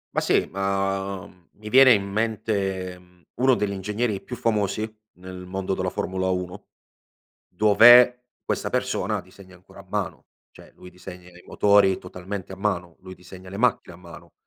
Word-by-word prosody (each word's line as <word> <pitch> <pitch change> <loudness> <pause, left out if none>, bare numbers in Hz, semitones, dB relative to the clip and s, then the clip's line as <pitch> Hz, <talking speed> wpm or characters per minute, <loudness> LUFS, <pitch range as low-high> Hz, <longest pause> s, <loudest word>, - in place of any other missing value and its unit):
Ma - - +2
sì, - - +1
ma, 95 0 -2
mhmm, 90 -2 -24
mi 105 0 -8
viene 130 +1 +7
in 100 -3 +1
mente, 100 -4 -2
mhmm, 90 0 -23
uno 130 +1 +3
degli 105 -4 -1
ingegneri 105 +2 -2
più 125 - -7
famosi 110 -1 -1 0.3
nel 90 0 -9
mondo 95 +1 -3
della 95 -1 -2
Formula 95 0 -2
Uno, 90 +2 -5 0.8
dov'è 120 +5 +6 0.2
questa - - -2
persona - - -1
disegna 95 0 -17
ancora 90 +1 -18
a - - -13
mano, - - -4 0.3
cioè - - -17
lui 90 - -14
disegna 90 0 -12
i 90 0 -17
motori 100 -2 +3
totalmente 95 +1 -8
a - - -7
mano, 90 -4 -3
lui 95 0 -11
disegna 90 +1 -13
le 100 - -8
macchine 115 -6 0
a - - -18
mano 85 -1 -14
95 Hz, 165 wpm, -24 LUFS, 90-105 Hz, 0.8 s, viene